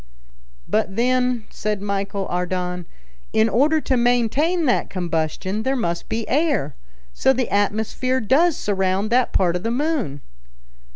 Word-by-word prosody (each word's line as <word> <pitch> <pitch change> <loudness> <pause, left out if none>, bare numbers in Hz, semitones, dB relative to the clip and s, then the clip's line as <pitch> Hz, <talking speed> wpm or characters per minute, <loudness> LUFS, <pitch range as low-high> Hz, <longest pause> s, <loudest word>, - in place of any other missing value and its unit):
"But, 210 -3 0
then," 250 0 +1
said 210 -1 -2
Michel 200 0 -2
Ardan, 180 -1 -3 0.5
"in 220 0 +4
order 290 +8 +3
to 265 - 0
maintain 245 +8 +2
that 250 - +1
combustion, 175 +3 -2
there 265 +4 0
must 170 -9 -2
be 225 -1 -2
air. 285 - +1 0.4
So 265 - +3
the 255 -2 -2
atmosphere 220 +5 0
does 285 +9 +3
surround 195 +1 0
that 250 +1 +3
part 175 -2 +2
of 180 - -2
the 225 - -2
moon." 250 - -1
220 Hz, 135 wpm, -22 LUFS, 190-255 Hz, 0.5 s, in